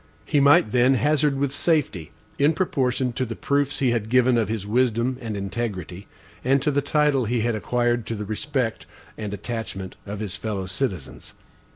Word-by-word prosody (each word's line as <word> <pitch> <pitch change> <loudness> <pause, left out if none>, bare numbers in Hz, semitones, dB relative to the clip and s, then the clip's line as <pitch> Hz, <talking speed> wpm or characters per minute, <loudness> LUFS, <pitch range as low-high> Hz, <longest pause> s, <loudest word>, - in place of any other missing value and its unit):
He 150 - +2
might, 140 -6 +5
then, 125 +2 +4
hazard 145 +1 +2
with 140 -1 -1
safety, 145 - 0 0.3
in 145 +3 +4
proportion 135 -8 0
to 130 - -1
the 115 -2 -4
proofs 140 0 0
he 130 -3 +2
had 110 -2 -1
given 125 0 +4
of 110 -4 +1
his 110 -3 -3
wisdom 120 +2 +1
and 110 -3 -4
integrity, 100 -3 -4 0.4
and 135 +2 +3
to 150 - +2
the 145 0 +1
title 145 -3 +2
he 120 +1 0
had 120 +1 +1
acquired 120 +1 0
to 115 - -2
the 105 0 -5
respect 120 +2 -2 0.3
and 105 -2 -5
attachment 100 -2 -5
of 100 0 -5
his 100 -3 -4
fellow 100 -2 -3
citizens. 95 - -4
120 Hz, 180 wpm, -24 LUFS, 105-135 Hz, 0.4 s, might